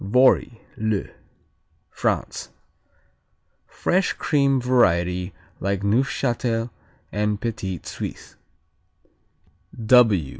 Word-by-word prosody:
Vory, 125 +2 +3 0.2
le 110 -2 -1 0.8
France - - -2 1.2
Fresh 185 +1 0
cream 140 -3 +2
variety 90 -7 +2 0.3
like 100 0 -1
Neufchâtel 120 +1 0 0.4
and 105 0 -1
Petit 105 -6 -3
Suisse. - - -7
115 Hz, 65 wpm, -23 LUFS, 100-125 Hz, 1.2 s, Vory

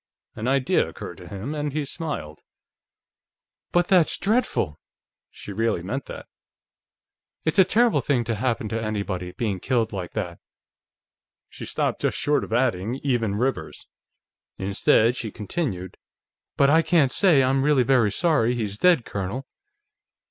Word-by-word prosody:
An 110 - -4
idea 135 -1 +2
occurred - - -9
to - - -12
him, 100 +9 -5
and 150 -2 -3
he 150 -1 -1
smiled. 135 - -5 1.3
"But 175 0 +2
that's 180 -4 +4
dreadful!" 195 - 0 0.5
She 100 - -9
really 110 -4 0
meant 130 +9 -4
that. - - -8 1.2
"It's 160 +4 +1
a - - +9
terrible 225 +5 +3
thing 130 -5 +1
to 115 0 -2
happen 115 0 -1
to 115 +1 -2
anybody, 100 -4 -3
being 100 -2 -2
killed 115 0 0
like 95 -3 -5
that." 90 -6 -4 1.1
She - - -9
stopped - - -1
just - - 0
short 145 0 +1
of - - -8
adding: 115 -2 0
"even 120 -7 0
Rivers." 130 +5 -2 0.7
Instead, 100 +4 +2
she 115 - -4
continued: 105 - -4 0.6
"But 140 0 +5
I 160 +2 +6
can't 160 -6 +3
say 165 -9 +4
I'm 135 +1 +2
really 145 -3 +4
very 125 -5 +3
sorry 145 - +2
he's 105 -3 -3
dead, 175 -9 +4
Colonel." 100 +7 -4
120 Hz, 145 wpm, -24 LUFS, 105-145 Hz, 1.3 s, a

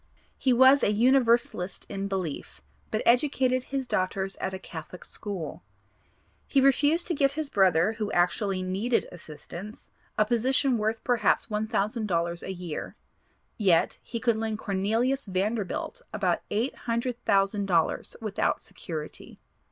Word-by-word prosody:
He 260 - +1
was 260 +3 +6
a - - +3
Universalist 235 -5 +2
in 195 0 -4
belief, 170 - -4 0.3
but - - -1
educated 255 0 +2
his 270 -1 -3
daughters 190 -2 -1
at 190 - -3
a 190 - -4
Catholic 175 -1 -9
school. 195 -7 -6 0.9
He 275 - +3
refused 290 +5 +4
to 350 - -1
get 275 -2 +2
his 300 -1 -4
brother, 190 0 +3
who 220 -2 -3
actually 185 +2 +1
needed 200 +6 0
assistance, 175 +5 -10 0.3
a 215 - +4
position 250 +2 +2
worth 220 +1 -1
perhaps 245 -2 +2
$1,000 210 -5 -1
a - - -5
year; 175 -4 -6 0.6
yet, 185 -6 +3
he 235 - -5
could 235 -2 +1
lend 220 -1 -2
Corneel. 205 +3 0 0.2
Vanderbilt 205 - -2
about - - 0
eight 225 +6 0 0.2
hundred 235 +1 -1
thousand 195 +1 +2
dollars 170 -4 +1
without 215 -3 -1
security. 155 -3 -8
215 Hz, 135 wpm, -27 LUFS, 190-245 Hz, 0.9 s, was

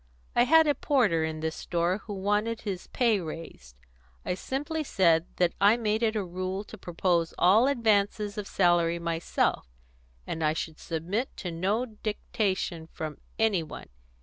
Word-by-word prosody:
I 240 - +5
had 320 +4 +6
a 295 - +3
porter 225 - +2
in 160 0 -3
this 160 0 -2
store 175 +3 -1
who 205 0 -7
wanted 210 +4 0
his 195 -4 -5
pay 230 -5 +2
raised. 155 - -8 0.5
I - - 0
simply 295 - -3
said 170 - +3
that 175 -1 +2
I 205 +3 +6
made 215 -1 0
it 225 -1 +1
a 210 - 0
rule 185 +2 -4
to 215 - -11
propose 170 -1 0
all 210 +8 +5
advances 210 -5 +1
of 210 -2 -5
salary 175 -2 +3
myself, 170 - -1 0.6
and 160 - -3
I 155 0 +3
should 160 0 -5
submit 180 +10 -3
to 180 - -4
no 195 +9 0
dictation 210 -6 -3
from 155 -2 -6 0.2
any 220 -6 +2
one. 155 -2 -9
190 Hz, 160 wpm, -28 LUFS, 170-220 Hz, 0.6 s, had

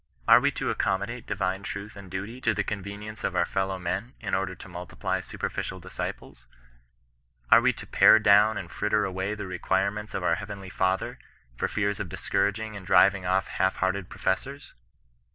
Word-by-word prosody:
Are - - +9
we - - +3
to - - -1
accommodate 100 +5 -1
divine 95 -1 -1
truth 100 0 -6
and 100 -2 -11
duty 100 +7 -5
to 115 -3 +1
the 105 - 0
con 100 -2 -4
venience 105 +2 -7
of - - -1
our 85 - +3
fellow 95 +1 -1
men, 95 +8 -3
in - - -5
order 95 -1 0
to 85 - -11
multiply 90 -1 -3
super - - -4
ficial 95 - -5
disciples? 85 -8 -7 1.0
Are - - +9
we - - +4
to - - -9
pare - - +7
down 105 0 +5
and 90 -4 -6
fritter 105 0 +1
away 95 +2 -2
the 105 -1 -5
requirements 95 +3 -1
of 95 - -2
our 90 - +3
heavenly 100 0 -6
Father, 95 0 0 0.4
for - - -1
fear 100 -1 0
of 100 -3 -5
discouraging 100 +4 -1
and 100 - -7
driving 95 0 +4
off 95 +1 +2
half 95 +1 0
hearted 95 0 -1
professors? 135 +9 -3
95 Hz, 185 wpm, -27 LUFS, 95-105 Hz, 1.0 s, Are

